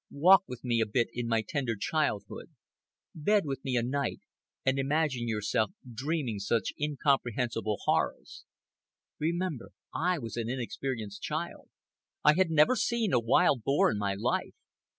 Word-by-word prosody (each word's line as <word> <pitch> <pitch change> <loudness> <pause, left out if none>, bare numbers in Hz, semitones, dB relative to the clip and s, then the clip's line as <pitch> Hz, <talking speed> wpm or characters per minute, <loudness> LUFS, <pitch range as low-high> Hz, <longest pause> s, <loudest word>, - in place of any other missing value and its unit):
Walk 190 +7 +5
with 125 -1 -8
me 120 -2 +1
a 110 - +1
bit 115 +3 +1
in 120 -1 -3
my 115 -1 +1
tender 130 -6 -1
childhood, 130 0 -2 0.6
bed 200 +5 +2
with 135 -2 -4
me 130 -2 -1
a 120 - +2
night 140 +3 -2 0.5
and 135 0 +2
imagine 135 -3 0
yourself 105 -1 0 0.2
dreaming 130 -3 -2
such 100 +1 0
incomprehensible 125 -7 0
horrors. - - -1 0.8
Remember 170 -4 -2 0.2
I 180 +2 +1
was 115 -5 -6
an 115 -1 -2
inexperienced 120 -4 -4
child. - - -4 0.5
I 150 - +7
had 185 +1 +2
never 160 +9 +5
seen 235 -3 0
a - - +5
wild 125 +3 +3
boar 140 +1 +3
in 105 - -2
my 100 -1 -1
life. 100 - -1
130 Hz, 150 wpm, -30 LUFS, 115-155 Hz, 0.8 s, I